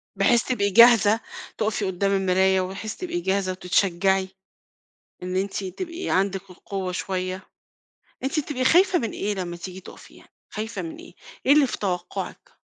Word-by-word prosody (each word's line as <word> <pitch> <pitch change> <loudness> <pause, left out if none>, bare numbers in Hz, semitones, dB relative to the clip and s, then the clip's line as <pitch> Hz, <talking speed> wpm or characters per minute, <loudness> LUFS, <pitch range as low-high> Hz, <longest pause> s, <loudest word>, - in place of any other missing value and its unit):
بحيث 215 +4 +3
تبقى 205 -6 0
جاهزة، 225 0 +7 0.4
تُقفي 215 -1 -1
قدّام 190 +1 0
المراية 190 0 +3
وبحيث 195 +4 -5
تبقى 350 -1 -4
جاهزة 190 - 0
وتتشجّعي 190 +1 +1 0.9
إن 180 0 -3
أنتِ 195 +1 -2
تبقي 335 - -5
عندِك 195 0 0
القوة 185 0 -5
شوية. 185 0 -3 0.8
أنتِ 270 +3 0
بتبقى 275 -3 -2
خايفة 360 +5 +5
من 230 -3 -3
إيه 205 +1 -2
لمّا 175 -2 -4
تيجي 185 +2 -8
تُقفي 185 - -14
يعني، - - -19 0.2
خايفة 220 +2 -5
من 325 -1 -6
إيه، 340 +2 -13 0.3
إيه 275 - +6
اللي 295 -2 +5
في - - -4
توقُّعِك؟ 190 - -5
195 Hz, 150 wpm, -24 LUFS, 185-240 Hz, 0.9 s, جاهزة